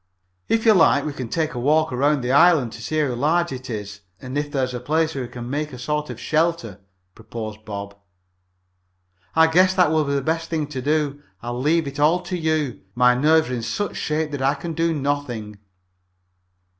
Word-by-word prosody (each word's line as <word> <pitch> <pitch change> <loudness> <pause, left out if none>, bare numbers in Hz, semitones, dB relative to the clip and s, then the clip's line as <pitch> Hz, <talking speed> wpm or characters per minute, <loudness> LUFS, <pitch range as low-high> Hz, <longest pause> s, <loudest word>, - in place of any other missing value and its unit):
"If 225 0 +1
you 220 - +7
like 160 -6 +4
we'll 150 - -3
take 155 +5 -1
a 125 - -4
walk 155 +4 +2
around 140 +3 +1
the 125 +1 -1
island, 140 -4 +4
see 155 - -4
how 145 -5 +1
large 160 +7 +1
it 130 0 -7
is 105 -3 -6 0.2
and 130 +1 -7
if 145 0 -1
there's 130 -3 -1
a 125 - -3
place 160 +5 0
where 135 -2 -3
we - - -10
can 120 -1 -8
make 150 +3 -3
a 125 - -8
sort 150 +4 -2
of 120 -2 -7
shelter," 155 - -1 0.3
proposed 110 -1 -8
Bob. 100 -1 -6 1.4
"I 160 0 +6
guess 185 +3 +4
that 180 -4 +4
will 155 -1 +2
be 140 0 -1
the 140 - -1
best 165 +3 -1
thing 160 -2 -1
to 135 -3 -5
do. 145 0 0 0.2
I 120 - -4
leave 150 +7 +1
it 140 +1 -6
all 155 +4 +4
to 180 0 -4
you. 155 -6 -1
My 125 0 +5
nerves 155 +2 +3
are - - -2
in 120 - -2
such 205 - -3
shape 155 0 -2
that 145 -2 -4
I 135 +2 +2
can 165 +4 -6
do 165 +1 +1
nothing." 135 -8 -3
145 Hz, 205 wpm, -22 LUFS, 125-160 Hz, 1.4 s, you